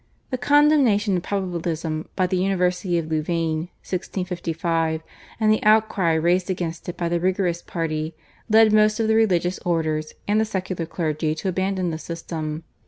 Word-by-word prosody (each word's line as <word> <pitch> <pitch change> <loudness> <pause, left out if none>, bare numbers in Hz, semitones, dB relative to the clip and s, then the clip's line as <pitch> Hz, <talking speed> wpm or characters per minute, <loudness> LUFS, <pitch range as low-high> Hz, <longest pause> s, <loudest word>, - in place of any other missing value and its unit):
The 255 - 0
condemnation 265 -8 +4
of 180 - 0
Probabilism 170 -4 -3
by 185 - +2
the 180 - -1
University 180 -1 +1
of 165 - -1
Louvain 160 +1 -1 0.2
(1655) 165 -3 -2 0.4
and 215 -1 +4
the 215 - +1
outcry 215 -5 +3
raised 175 +4 +2
against 175 -2 -3
it 175 - -6
by 170 - -1
the 170 0 0
Rigorist 180 -1 0
party 155 -1 -3 0.3
led 220 0 +6
most 215 0 +4
of 225 - +1
the 220 - +3
religious 185 -5 +2
orders 155 -3 -1
and 210 +1 +3
the - - +2
secular 185 -5 -3
clergy 155 -2 -1
to 190 +4 -2
abandon 190 -1 -1
the 160 - -4
system. 160 -2 -5
175 Hz, 160 wpm, -23 LUFS, 165-195 Hz, 0.4 s, led